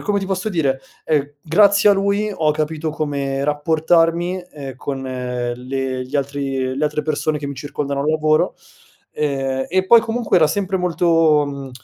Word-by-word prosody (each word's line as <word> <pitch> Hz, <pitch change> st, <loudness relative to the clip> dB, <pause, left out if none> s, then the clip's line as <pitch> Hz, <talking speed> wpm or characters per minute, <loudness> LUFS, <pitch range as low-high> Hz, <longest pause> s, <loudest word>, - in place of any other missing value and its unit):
come 205 Hz, -1 st, +2 dB
ti -, -, -3 dB
posso 190 Hz, +2 st, -2 dB
dire, 140 Hz, -8 st, 0 dB, 0.2 s
ehm, 145 Hz, -2 st, 0 dB
grazie 200 Hz, +5 st, +5 dB
a -, -, +7 dB
lui 200 Hz, +2 st, 0 dB
ho 155 Hz, -3 st, +2 dB
capito 155 Hz, +1 st, -2 dB
come 140 Hz, -3 st, -2 dB
rapportarmi, 165 Hz, +4 st, +1 dB
ehm, 135 Hz, -3 st, -8 dB
con 135 Hz, 0 st, -5 dB
le 130 Hz, +1 st, -3 dB
gli 140 Hz, -, -3 dB
altri 135 Hz, -2 st, -2 dB
le 150 Hz, -, 0 dB
altre 150 Hz, 0 st, -1 dB
persone 155 Hz, 0 st, -1 dB
che 140 Hz, -, -5 dB
mi 140 Hz, -, -5 dB
circondano 140 Hz, 0 st, -4 dB
al 145 Hz, -, -1 dB
lavoro, 155 Hz, +2 st, +2 dB, 0.6 s
ehm, 135 Hz, -3 st, -2 dB
e 185 Hz, +1 st, +1 dB
poi 230 Hz, +4 st, +7 dB
comunque 225 Hz, -2 st, 0 dB
era 160 Hz, -3 st, +5 dB
sempre 195 Hz, +1 st, -1 dB
molto, 165 Hz, -3 st, +3 dB
mhmm, 140 Hz, -2 st, -7 dB
150 Hz, 165 wpm, -20 LUFS, 135-175 Hz, 0.6 s, a